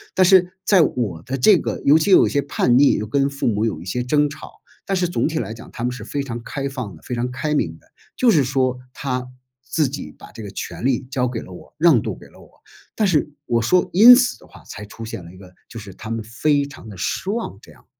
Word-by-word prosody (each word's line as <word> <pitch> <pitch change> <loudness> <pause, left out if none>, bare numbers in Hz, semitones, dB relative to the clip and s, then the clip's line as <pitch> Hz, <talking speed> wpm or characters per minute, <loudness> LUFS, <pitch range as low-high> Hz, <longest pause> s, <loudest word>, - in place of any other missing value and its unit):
但 190 - +5
是 185 -1 +5
在 190 -2 +4
我 105 - -1
的 130 +5 -4
这 190 +9 +6
个 - - -4
尤 150 +3 +5
其 160 - 0
又 190 - +8
有 - - +3
些 140 - +1
叛 125 -3 +2
逆， 140 - +5
又 105 - -2
跟 140 +5 +1
父 140 0 -3
母 110 -1 +1
有 90 -9 -3
一 - - -10
些 95 +7 -2
争 145 +4 +1
吵， 150 - -10 0.3
但 195 - -1
是 180 -2 0
总 - - 0
体 160 0 -2
来 110 -2 -4
讲 115 - -12
他 115 - -6
们 125 - 0
是 120 -4 -8
非 140 +4 -3
常 120 -3 -6
开 140 +3 -4
放 125 -8 -6
的， - - -17
非 125 - -5
常 120 +1 -2
开 150 +4 -2
明 80 - -1
的。 - - -29 0.3
就 245 -3 +4
是 145 -8 +3
说， 130 -1 0
他 125 -2 -3 0.4
自 155 -5 +1
己 125 - -7
把 - - -14
这 - - -10
个 105 - -7
权 100 - -6
利 135 -1 +1
交 125 -2 0
给 120 -2 -4
了 - - -12
我， 90 - -13
让 155 -8 +5
渡 - - -5
给 - - -15
了 - - -20
我， - - -17 0.5
但 215 - +1
是 150 -4 +1
我 120 -2 +1
说 180 +11 +2
因 230 +7 +10
此 255 0 +1
的 - - -18
话， - - -16
才 105 - -9
出 115 +2 -11
现 105 -5 -7
了 85 - -12
一 95 - -15
个 90 -1 -15 0.2
就 115 - -10
是 100 -3 -10
他 110 - -10
们 115 -1 -3
非 140 +6 0
常 140 -5 -12
地 100 - -10
失 140 - -3
望， 215 - -4
这 - - -16
样。 - - -23
130 Hz, 290 characters per minute, -21 LUFS, 115-155 Hz, 0.5 s, 因